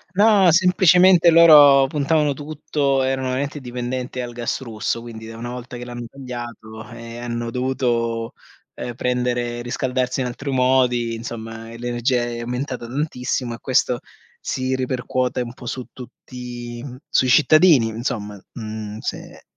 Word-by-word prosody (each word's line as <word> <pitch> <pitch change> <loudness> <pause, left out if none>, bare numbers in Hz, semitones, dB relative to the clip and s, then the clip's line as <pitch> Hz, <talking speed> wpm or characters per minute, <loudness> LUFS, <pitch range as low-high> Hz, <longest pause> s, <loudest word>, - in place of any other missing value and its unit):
No, 200 -3 +5
semplicemente 180 0 +5
loro 145 -5 +8
puntavano 150 0 +1
tutto 145 -2 -1
erano 130 0 -1
veramente 140 +3 -3
dipendente 125 0 -4
al 120 0 -5
gas 120 +2 -3
russo. 115 -1 -3
Quindi 110 -1 -9
una 115 +2 -7
volta 125 0 -7
che 120 0 -7
l'hanno 120 -1 -7
tagliato 120 -4 -8
e 115 0 -9
hanno 120 -1 -4
dovuto, 120 -2 -1 0.4
ehm, 120 - -5
prendere 120 -1 -1
riscaldarsi 125 +1 -1
in 125 - 0
altri 135 +3 -5
modi, 125 -2 +2
insomma, 115 -1 -7
l'energia 120 +1 0
è 120 0 -5
aumentata 125 +1 -4
tantissimo 125 -2 -3
e - - -11
questo 125 -2 +1 0.4
si 130 0 -2
ripercuote 130 -1 -1
un 120 0 -5
po' - - -12
su 125 +1 -4
tutti 120 -1 -9
mhmm, 125 -2 -9
sui 130 - +2
cittadini, 150 -2 +5
insomma, 110 -3 -4
mhmm, 110 -2 -6
se - - -7
125 Hz, 140 wpm, -21 LUFS, 120-135 Hz, 0.4 s, loro